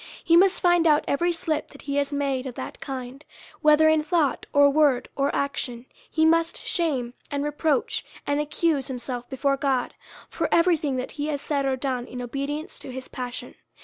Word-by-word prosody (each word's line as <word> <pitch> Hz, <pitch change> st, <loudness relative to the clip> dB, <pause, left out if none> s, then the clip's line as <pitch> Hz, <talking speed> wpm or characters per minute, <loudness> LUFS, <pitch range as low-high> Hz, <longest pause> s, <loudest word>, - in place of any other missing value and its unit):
He 335 Hz, -, +4 dB
must 380 Hz, +2 st, +5 dB
find 350 Hz, -2 st, +4 dB
out 300 Hz, -1 st, +4 dB
every 345 Hz, +5 st, +1 dB
slip 320 Hz, -2 st, -2 dB
that 280 Hz, -, -15 dB
he 280 Hz, -1 st, -2 dB
has 285 Hz, 0 st, 0 dB
made 275 Hz, -2 st, -1 dB
of 250 Hz, -, -7 dB
that -, -, -7 dB
kind, 265 Hz, +1 st, -6 dB, 0.4 s
whether 305 Hz, 0 st, +6 dB
in 315 Hz, 0 st, +4 dB
thought, 310 Hz, -3 st, 0 dB
or 285 Hz, 0 st, +6 dB
word, 280 Hz, -3 st, +3 dB
or 275 Hz, 0 st, +1 dB
action; 255 Hz, -3 st, -3 dB, 0.2 s
he 315 Hz, 0 st, +2 dB
must 330 Hz, +1 st, +3 dB
shame, 320 Hz, -, -1 dB, 0.2 s
and 285 Hz, 0 st, -2 dB
reproach, 310 Hz, +10 st, 0 dB, 0.2 s
and 285 Hz, 0 st, 0 dB
accuse 300 Hz, -2 st, 0 dB
himself 245 Hz, -1 st, -5 dB
before 275 Hz, +1 st, 0 dB
God, 265 Hz, -3 st, 0 dB, 0.3 s
for -, -, -2 dB
every 340 Hz, +1 st, +5 dB
thing 290 Hz, -4 st, -2 dB
that 255 Hz, 0 st, -3 dB
he 295 Hz, 0 st, -4 dB
has 295 Hz, -2 st, -1 dB
said 280 Hz, -1 st, -1 dB
or 265 Hz, -, +1 dB
done 255 Hz, -2 st, -3 dB
in 250 Hz, -, -7 dB
obedience 280 Hz, +5 st, -4 dB
to 265 Hz, -, -8 dB
his 260 Hz, 0 st, -7 dB
pas 250 Hz, -1 st, -5 dB
sion. -, -, -7 dB
285 Hz, 195 wpm, -25 LUFS, 265-315 Hz, 0.4 s, whether